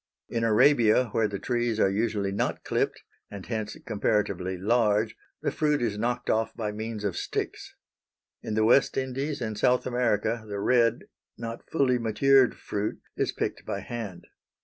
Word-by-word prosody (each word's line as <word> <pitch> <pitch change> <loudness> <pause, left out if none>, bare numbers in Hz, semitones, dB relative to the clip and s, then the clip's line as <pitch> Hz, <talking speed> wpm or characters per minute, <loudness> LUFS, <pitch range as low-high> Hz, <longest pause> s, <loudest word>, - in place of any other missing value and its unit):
In 115 -1 -1
Arabia, 120 0 +4
where 110 +1 +1
the 100 -1 -4
trees 120 +1 -1
are - - +5
usually 105 -1 0
not 100 - -2
clipped, - - -1 0.3
and 100 -2 -8
hence 110 -2 -4
comparatively 100 -4 0
large, 110 +1 +2 0.3
the - - +1
fruit 150 -1 +1
is 115 -4 -1
knocked 120 +2 -1
off 110 0 0
by 105 -2 -2
means 110 0 -5
of 100 -4 -1
sticks. - - -4 0.7
In 105 - -4
the 110 0 +3
West 125 +4 +4
Indies 135 +2 -2
and 110 -2 -2
South 125 +4 +2
America 120 -2 0
the 100 -1 -4
red, 115 +2 +3 0.3
not 115 0 -7
fully 130 -5 +2
matured 130 +3 +4
fruit 105 +1 -3 0.2
is - - 0
picked - - -3
by - - -4
hand. 110 -7 -6
115 Hz, 160 wpm, -27 LUFS, 105-120 Hz, 0.7 s, are